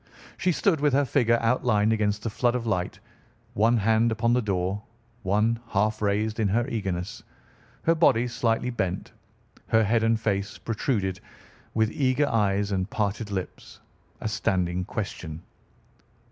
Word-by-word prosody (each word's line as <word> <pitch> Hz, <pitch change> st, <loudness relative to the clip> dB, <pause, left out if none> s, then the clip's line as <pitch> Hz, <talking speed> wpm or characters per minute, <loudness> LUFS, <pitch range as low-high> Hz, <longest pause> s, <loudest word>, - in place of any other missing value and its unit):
She 185 Hz, -, +1 dB
stood 170 Hz, -1 st, +2 dB
with 145 Hz, -2 st, +3 dB
her 140 Hz, +1 st, +3 dB
figure 115 Hz, -3 st, +3 dB
outlined 115 Hz, -2 st, +2 dB
against 105 Hz, -1 st, 0 dB
the 115 Hz, -, -1 dB
flood 120 Hz, +2 st, +1 dB
of 120 Hz, -2 st, -2 dB
light, 90 Hz, -5 st, -1 dB, 0.5 s
one 115 Hz, +3 st, +3 dB
hand 110 Hz, +2 st, +3 dB
upon 115 Hz, +2 st, +1 dB
the 125 Hz, -, +3 dB
door, 95 Hz, -1 st, -1 dB, 0.4 s
one 105 Hz, +3 st, +1 dB
half 105 Hz, +1 st, 0 dB
raised 105 Hz, +2 st, 0 dB
in 110 Hz, -, +2 dB
her 115 Hz, +5 st, +1 dB
eagerness, 105 Hz, -1 st, -3 dB, 0.6 s
her 165 Hz, -, +4 dB
body 125 Hz, -7 st, +3 dB
slightly 120 Hz, 0 st, 0 dB
bent, 95 Hz, -6 st, -3 dB, 0.6 s
her 110 Hz, 0 st, +4 dB
head 115 Hz, +2 st, +2 dB
and 115 Hz, 0 st, +2 dB
face 100 Hz, -3 st, -1 dB
protruded, 105 Hz, -5 st, -1 dB, 0.6 s
with 110 Hz, -1 st, +2 dB
eager 140 Hz, +1 st, +1 dB
eyes 100 Hz, -4 st, +1 dB
and 95 Hz, 0 st, -1 dB
parted 105 Hz, 0 st, -2 dB
lips, 95 Hz, -2 st, -6 dB, 0.4 s
a -, -, -2 dB
standing 90 Hz, -5 st, 0 dB
question. 85 Hz, -6 st, -5 dB
110 Hz, 145 wpm, -26 LUFS, 100-115 Hz, 0.6 s, her